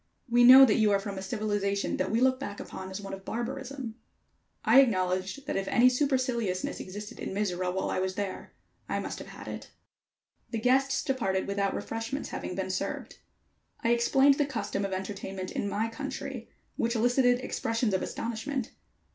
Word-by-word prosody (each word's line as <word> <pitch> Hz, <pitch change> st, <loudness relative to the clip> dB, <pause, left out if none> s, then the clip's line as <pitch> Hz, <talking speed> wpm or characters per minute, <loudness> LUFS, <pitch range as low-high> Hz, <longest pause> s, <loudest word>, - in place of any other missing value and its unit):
"We 240 Hz, 0 st, +4 dB
know 260 Hz, +2 st, +11 dB
that 225 Hz, -2 st, +2 dB
you 215 Hz, -1 st, +4 dB
are 200 Hz, -, +3 dB
from 195 Hz, -1 st, -5 dB
a -, -, -6 dB
civilization 200 Hz, -1 st, -1 dB
that 185 Hz, -, -1 dB
we 225 Hz, +3 st, +1 dB
look 260 Hz, 0 st, +3 dB
back 205 Hz, -7 st, -6 dB
upon 190 Hz, 0 st, -7 dB
as 190 Hz, -, -5 dB
one 195 Hz, -1 st, -7 dB
of 195 Hz, 0 st, -7 dB
barbarism." 250 Hz, +2 st, -4 dB, 0.7 s
I 235 Hz, +5 st, +8 dB
acknowledged 185 Hz, +1 st, 0 dB
that -, -, -3 dB
if 195 Hz, 0 st, -2 dB
any 250 Hz, +1 st, +5 dB
superciliousness 250 Hz, -8 st, 0 dB
existed 205 Hz, +3 st, -8 dB
in -, -, -4 dB
Mizora 185 Hz, -3 st, -1 dB
while 190 Hz, +1 st, -2 dB
I -, -, 0 dB
was 185 Hz, 0 st, -1 dB
there, 200 Hz, -1 st, -5 dB, 0.3 s
I -, -, 0 dB
must -, -, -5 dB
have -, -, -9 dB
had -, -, -10 dB
it. -, -, -7 dB, 0.8 s
The 230 Hz, -, -3 dB
guests 265 Hz, +3 st, +2 dB
departed 195 Hz, -8 st, 0 dB
without 200 Hz, 0 st, -1 dB
refreshments 225 Hz, +6 st, -4 dB
having -, -, -5 dB
been -, -, -2 dB
served. -, -, -4 dB, 0.6 s
I 230 Hz, -, +2 dB
explained 270 Hz, +4 st, +4 dB
the 290 Hz, -, +3 dB
custom 225 Hz, -6 st, -3 dB
of 195 Hz, -, -4 dB
entertainment 190 Hz, 0 st, -5 dB
in 200 Hz, -, -2 dB
my 215 Hz, +3 st, 0 dB
country, 225 Hz, 0 st, -6 dB, 0.3 s
which 235 Hz, +1 st, 0 dB
elicited 245 Hz, +2 st, +3 dB
expressions 230 Hz, -3 st, -1 dB
of 190 Hz, -, +1 dB
astonishment. 235 Hz, +2 st, -3 dB
225 Hz, 180 wpm, -29 LUFS, 195-255 Hz, 0.8 s, know